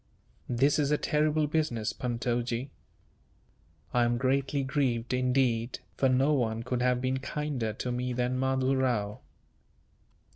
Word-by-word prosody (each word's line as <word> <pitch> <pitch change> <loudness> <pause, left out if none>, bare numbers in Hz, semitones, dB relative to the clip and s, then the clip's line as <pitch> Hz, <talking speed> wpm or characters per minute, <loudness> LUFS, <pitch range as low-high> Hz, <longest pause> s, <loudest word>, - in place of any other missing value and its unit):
"This 135 +5 +3
is 145 -2 +2
a 150 - +3
terrible 150 +1 +1
business, 145 -8 -1
Puntojee." 120 +1 -2 1.2
"I 120 - +4
am 120 0 +1
greatly 135 +2 +1
grieved, 130 -4 0
indeed, 125 -2 +1 0.2
for 135 - +2
no 135 +4 +3
one 115 -4 0
could 125 0 -2
have 125 0 +2
been 130 +1 0
kinder 140 -5 -2
to 125 +4 -4
me 125 +1 -2
than 125 +1 -1
Mahdoo 130 0 +1
Rao." 115 -6 0
130 Hz, 135 wpm, -29 LUFS, 120-140 Hz, 1.2 s, I